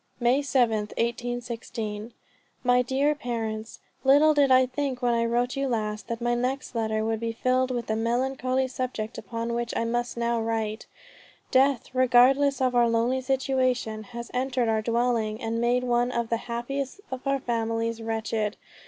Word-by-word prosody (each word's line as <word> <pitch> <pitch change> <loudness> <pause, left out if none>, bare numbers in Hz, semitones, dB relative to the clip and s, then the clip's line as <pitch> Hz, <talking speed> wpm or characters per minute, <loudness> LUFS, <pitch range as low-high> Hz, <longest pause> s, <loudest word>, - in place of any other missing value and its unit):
"May 245 +2 +3
7th, 230 -7 +1
1816. 235 -2 -3 0.5
My 250 0 +4
dear 270 +4 +1
Parents, 225 -5 -4 0.3
Little 290 +3 +6
did 285 -2 +4
I 255 0 +6
think 260 0 -3
when 240 -1 +3
I 230 0 +1
wrote 240 +2 0
you 275 0 -1
last, 215 -4 -2
that 230 -1 -3
my 240 0 0
next 255 +3 -2
letter 220 -2 -1
would 225 0 -1
be 230 0 -2
filled 255 +2 +1
with 245 -2 -2
the 220 - -1
melancholy 255 +3 0
subject 250 -4 -4
upon 230 0 -4
which 235 0 -2
I - - +1
must 240 +1 -2
now 235 0 0
write. 225 -1 -2 0.6
Death, 265 -2 +2
regardless 260 +2 +4
of 255 -1 +2
our 240 -1 +4
lonely 235 +3 +1
situation 255 -4 0
has 235 0 -8
entered 255 -1 0
our 220 -1 +2
dwelling, 230 -1 0
and 230 0 -2
made 245 +1 +2
one 245 0 +1
of 235 -2 -2
the 230 - +1
happiest 265 +6 -3
of 260 -1 -4 0.2
families 230 -1 -1
wretched. 220 -1 -2
240 Hz, 160 wpm, -26 LUFS, 230-255 Hz, 0.6 s, Little